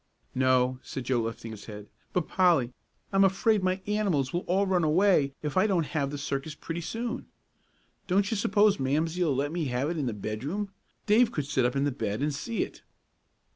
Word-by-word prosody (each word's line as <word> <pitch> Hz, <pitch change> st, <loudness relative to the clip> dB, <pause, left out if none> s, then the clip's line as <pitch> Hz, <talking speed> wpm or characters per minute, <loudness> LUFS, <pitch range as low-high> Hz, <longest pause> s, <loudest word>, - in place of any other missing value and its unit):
"No," 130 Hz, 0 st, +2 dB
said 130 Hz, -, -6 dB
Joe, 125 Hz, -1 st, +1 dB
lifting 115 Hz, 0 st, -5 dB
his 105 Hz, -2 st, -9 dB
head; 105 Hz, -1 st, -9 dB, 0.2 s
"but, 180 Hz, -3 st, -1 dB
Polly, 170 Hz, -10 st, +3 dB, 0.4 s
I'm 195 Hz, 0 st, +5 dB
afraid 195 Hz, +2 st, +3 dB
my 185 Hz, +1 st, 0 dB
animals 195 Hz, -11 st, 0 dB
will 175 Hz, -, +1 dB
all 195 Hz, +3 st, +2 dB
run 185 Hz, -3 st, +2 dB
away 155 Hz, -4 st, +3 dB
if 150 Hz, -2 st, -3 dB
I 185 Hz, +3 st, +4 dB
don't 180 Hz, -6 st, +1 dB
have 145 Hz, -3 st, -1 dB
the 145 Hz, -, -5 dB
circus 140 Hz, +2 st, -3 dB
pretty 165 Hz, +2 st, -5 dB
soon. 230 Hz, +7 st, -4 dB, 0.8 s
Don't 200 Hz, +3 st, +2 dB
you -, -, +1 dB
s'pose 205 Hz, -1 st, +3 dB
Mamsie'll 155 Hz, +3 st, +1 dB
let 145 Hz, +2 st, -1 dB
me 170 Hz, -1 st, -2 dB
have 130 Hz, +4 st, -1 dB
it 170 Hz, -, -3 dB
in 140 Hz, -, -1 dB
the 120 Hz, -, -1 dB
bedroom 140 Hz, -, -4 dB, 0.3 s
Dave 225 Hz, +3 st, +4 dB
could 150 Hz, -, -2 dB
sit 135 Hz, -3 st, +1 dB
up 125 Hz, -, 0 dB
in 135 Hz, -, +1 dB
the 145 Hz, -, +1 dB
bed 110 Hz, -1 st, -2 dB
and 150 Hz, 0 st, 0 dB
see 215 Hz, +11 st, -2 dB
it." -, -, -10 dB
150 Hz, 200 wpm, -28 LUFS, 130-190 Hz, 0.8 s, I'm